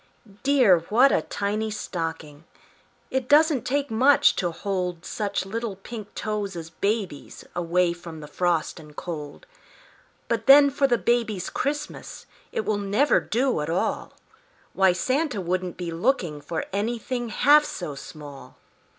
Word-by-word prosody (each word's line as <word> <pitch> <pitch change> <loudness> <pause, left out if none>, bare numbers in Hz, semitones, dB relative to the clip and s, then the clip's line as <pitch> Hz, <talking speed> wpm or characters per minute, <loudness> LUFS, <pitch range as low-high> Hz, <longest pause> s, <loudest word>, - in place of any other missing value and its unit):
Dear! 255 -10 +5
what 250 +6 +5
a - - +2
tiny 210 +2 -2
stocking! 165 -6 -5 0.7
It 260 -1 -2
doesn't 300 -3 +4
take 285 0 -1
much 260 +6 +5
to 175 - 0
hold 180 -1 -3
Such 205 -4 -2
little 220 +1 -4
pink 210 +2 -9
toes 210 -3 -3
as 165 -1 -7
baby's 200 -5 -3
Away 175 0 +1
from 170 -2 -10
the 150 - -9
frost 175 0 -1
and 150 -2 -14
cold. 150 -5 -7 0.8
But 225 -1 -2
then 280 +1 +8
for 275 0 +2
the 240 -2 +2
baby's 230 -6 0
Christmas 295 +2 -4 0.3
It 460 -2 -2
will 210 -1 0
never 205 +9 +2
do 245 - 0
at 150 - -3
all; 170 - -1 0.6
Why, 190 -1 +4
Santa 260 - -1
wouldn't 180 0 -2
be 175 -2 -4
looking 165 - 0
For 160 +3 -4
anything 235 +3 -2
half 290 +7 +5
so 175 - -5
small. 140 -2 -11
200 Hz, 140 wpm, -25 LUFS, 170-245 Hz, 0.8 s, then